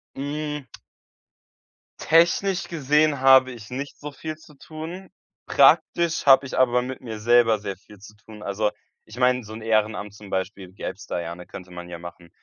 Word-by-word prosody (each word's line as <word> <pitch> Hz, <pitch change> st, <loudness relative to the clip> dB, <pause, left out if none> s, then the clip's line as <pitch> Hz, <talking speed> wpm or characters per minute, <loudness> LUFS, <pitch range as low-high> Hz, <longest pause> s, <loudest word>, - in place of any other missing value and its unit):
Hm. 150 Hz, +1 st, -4 dB, 1.4 s
Technisch 175 Hz, +4 st, +3 dB
gesehen 150 Hz, -2 st, +2 dB
habe 130 Hz, -1 st, +6 dB
ich 115 Hz, -4 st, -11 dB
nicht 140 Hz, +3 st, -6 dB
so 150 Hz, 0 st, -7 dB
viel 155 Hz, +3 st, -6 dB
zu 150 Hz, -2 st, -18 dB
tun, 165 Hz, +6 st, -9 dB, 0.4 s
praktisch 170 Hz, -2 st, +3 dB
habe 135 Hz, 0 st, +7 dB
ich 130 Hz, -, -5 dB
aber 125 Hz, -1 st, +3 dB
mit 130 Hz, +1 st, -6 dB
mir 110 Hz, -3 st, -7 dB
selber 115 Hz, -1 st, +4 dB
sehr 100 Hz, -3 st, -5 dB
viel 105 Hz, 0 st, -17 dB
zu 105 Hz, +1 st, -14 dB
tun. 110 Hz, -1 st, -14 dB
Also 105 Hz, +1 st, -1 dB, 0.3 s
ich 110 Hz, +3 st, -13 dB
meine, 125 Hz, -1 st, +2 dB
so 110 Hz, +1 st, -10 dB
'n 110 Hz, -, -8 dB
Ehrenamt 110 Hz, -2 st, 0 dB
zum 105 Hz, -1 st, -13 dB
Beispiel, 95 Hz, -1 st, -4 dB
gäb's -, -, -7 dB
da -, -, -3 dB
ja, 85 Hz, 0 st, -6 dB
ne, 90 Hz, 0 st, -11 dB
könnte 90 Hz, -1 st, -11 dB
man 90 Hz, 0 st, -9 dB
ja 85 Hz, -1 st, -7 dB
machen. 85 Hz, 0 st, -11 dB
120 Hz, 180 wpm, -24 LUFS, 105-145 Hz, 1.4 s, habe